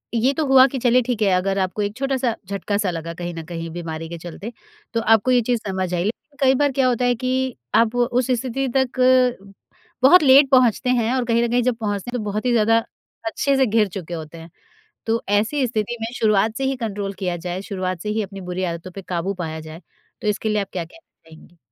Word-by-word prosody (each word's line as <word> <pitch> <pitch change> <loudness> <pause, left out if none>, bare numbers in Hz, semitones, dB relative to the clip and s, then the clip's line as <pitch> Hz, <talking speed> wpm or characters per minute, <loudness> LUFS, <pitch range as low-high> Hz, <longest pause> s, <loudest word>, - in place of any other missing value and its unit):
ये 245 +4 +2
तो 310 +2 -1
हुआ 265 -1 +7
कि 270 - -5
चलिए 245 +1 +4
ठीक 240 -2 -3
है, 205 - +3
अगर 195 +2 0
आपको 190 +2 -1
एक 205 +1 -2
छोटा-सा 265 -3 0
झटका-सा 200 0 -2
लगा 165 0 -5
कहीं 175 +1 -5
न 165 - -6
कहीं 165 0 -6
बीमारी 165 -1 -6
के 170 - -6
चलते, 175 +7 -8 0.4
तो 230 - +1
आपको 225 +3 +3
ये 245 -1 +4
चीज़ 240 +1 0
समझ 185 -1 -2
आई। 175 - 0
लेकिन 240 +8 -5
कई 265 -1 +5
बार 285 +1 +2
क्या 265 -1 +2
होता 245 0 +1
है 245 - +2
कि 255 +1 -1 0.2
आप 230 +1 +3
वो 245 0 +3
उस 250 0 0
स्थिति 260 +2 -1
तक 260 -1 -1 1.0
बहुत 310 +5 +7
लेट 275 0 +7
पहुँचते 255 -1 +4
हैं, 240 -1 +2
और 255 -2 0
कहीं 235 0 +2
न 235 - 0
कहीं 245 0 +2
जब 250 -1 +1
पहुँचते 205 -1 -3
हैं 250 - -2
तो 215 - -4
बहुत 215 +4 -3
ही 250 - +2
ज़्यादा 225 -1 +4 0.5
अच्छे 275 +5 0
से 265 - +4
घिर 215 -2 +2
चुके 175 -3 -7
होते 160 0 -7
हैं। 165 +1 -11 0.6
तो 225 +1 0 0.2
ऐसी 260 +6 0
स्थिति 220 0 -2
में 225 - -2
शुरुआत 215 0 +2
से 270 - -2
ही 270 0 0
कंट्रोल 205 -4 -4
किया 175 -1 -1
जाए, 180 +2 -5
शुरुआत 185 -3 -4
से 210 - -4
ही 215 +1 0
अपनी 195 0 -9
बुरी 185 +1 -2
आदतों 170 +2 -8
पे 195 - -8
काबू 180 +2 -1
पाया 160 0 -5
जाए, 160 +2 -10 0.4
तो - - -3
इसके 210 +1 0
लिए 210 -1 +1
आप 195 - -6
क्या 175 -3 -3
कहना 170 - -22
चाहेंगी? 160 +2 -17
220 Hz, 235 wpm, -21 LUFS, 185-250 Hz, 1.0 s, हुआ